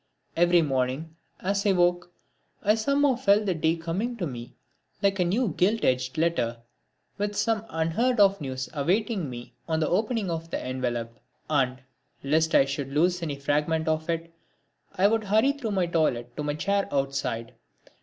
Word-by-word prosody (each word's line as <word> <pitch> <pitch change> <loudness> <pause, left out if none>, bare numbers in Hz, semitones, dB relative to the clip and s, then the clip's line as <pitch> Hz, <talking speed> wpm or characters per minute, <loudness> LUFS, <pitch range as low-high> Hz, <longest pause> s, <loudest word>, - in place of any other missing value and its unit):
Every 175 0 +4
morning, 135 +3 -1 0.3
as 200 +2 0
I 205 - +2
awoke, 175 -1 +2 0.5
I 210 - +4
somehow 280 +4 +2
felt 210 -3 +3
the 190 - +1
day 160 0 +1
coming 185 +9 -3
to 185 - -2
me 120 -4 -7 0.5
like 200 0 +2
a - - +4
new 205 +7 +1
gilt 210 +5 +2
edged 130 +2 0
letter, 130 -8 0 0.6
with 205 0 -1
some 225 0 0
unheard 165 +10 0
of 200 -3 +5
news 130 -2 -4
awaiting 185 - 0
me 120 -1 -9
on 160 -1 0
the 155 - +1
opening 215 0 0
of 165 0 -4
the - - -2
envelope. 120 -3 -3 0.3
And, 130 -3 +1 0.4
lest 160 +3 +2
I 135 - +6
should 135 0 -4
lose 175 +5 +2
any 155 -4 -3
fragment 150 +3 0
of 160 +1 -1
it, 165 0 -3 0.6
I 185 - +2
would 220 0 +1
hurry 220 +7 +3
through 280 -6 -5
my 185 -2 +2
toilet 125 -8 0
to - - -4
my 145 0 -2
chair 200 +5 0
outside. 135 -4 -2
165 Hz, 170 wpm, -26 LUFS, 140-200 Hz, 0.6 s, I